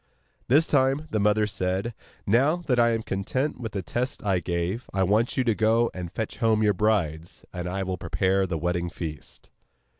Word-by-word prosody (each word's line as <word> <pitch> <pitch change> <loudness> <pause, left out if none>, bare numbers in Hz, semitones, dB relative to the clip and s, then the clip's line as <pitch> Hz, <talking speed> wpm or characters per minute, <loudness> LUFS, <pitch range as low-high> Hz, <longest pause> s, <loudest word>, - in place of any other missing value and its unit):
This 145 +7 +5
time 135 +2 +2
the 110 - 0
mother 105 +1 +3
said: 95 +3 -2 0.3
'Now 130 +10 +3
that 125 -4 +2
I 120 0 +5
am 115 -1 -1
content 125 +10 -2
with 115 -4 -5
the 100 -2 -3
tests 125 +8 -3
I 95 -3 +2
gave, 85 +7 -3
I 95 0 +1
want 105 +6 +1
you 130 - +3
to 115 -3 +2
go 110 +2 +2
and 90 -2 -6
fetch 110 - -4
home 110 -2 +2
your 105 -1 +4
brides, 90 -6 -1
and 90 -1 -4
I 95 +2 -2
will 95 -1 -3
prepare 95 0 +1
the 85 -2 -2
wedding 85 +1 -1
feast. 80 -4 -8
105 Hz, 190 wpm, -26 LUFS, 90-120 Hz, 0.3 s, This